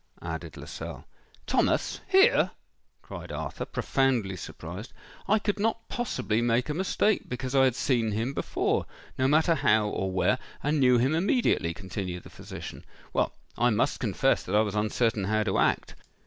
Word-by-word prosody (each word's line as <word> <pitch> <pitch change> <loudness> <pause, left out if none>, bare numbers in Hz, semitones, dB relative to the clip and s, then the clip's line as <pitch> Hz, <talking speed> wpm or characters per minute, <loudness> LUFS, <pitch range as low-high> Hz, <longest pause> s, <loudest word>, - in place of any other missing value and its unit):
added - - -5
Lascelles. - - -7 0.4
"Thomas!—here!" 385 +1 +3 0.5
cried - - -8
Arthur, - - -4
profoundly 125 -8 0
surprised. 90 +6 -8 0.3
"I 215 - +4
could 205 -1 -1
not 225 +2 -1
possibly 120 - -1
make 120 +3 +1
a - - 0
mistake, 190 +5 +1
because 125 +1 -4
I 135 -1 +5
had 130 -2 +2
seen 120 -4 +1
him 115 +6 -1
before—no 130 -1 -2
matter 160 +4 +4
how 110 -8 +3
or 95 -2 -2
where—and 145 +10 0
knew 125 -2 +5
him 130 +5 +2
immediately," 175 - +2
continued 95 -2 -5
the - - -13
physician. - - -8 0.3
"Well, - - +1 0.3
I 120 +2 +4
must 105 - +1
confess - - +1
that 95 - -3
I 105 - +6
was 105 -2 -1
uncertain 110 0 +1
how 110 +2 +1
to 100 -3 0
act. - - +1
120 Hz, 150 wpm, -28 LUFS, 105-150 Hz, 0.5 s, I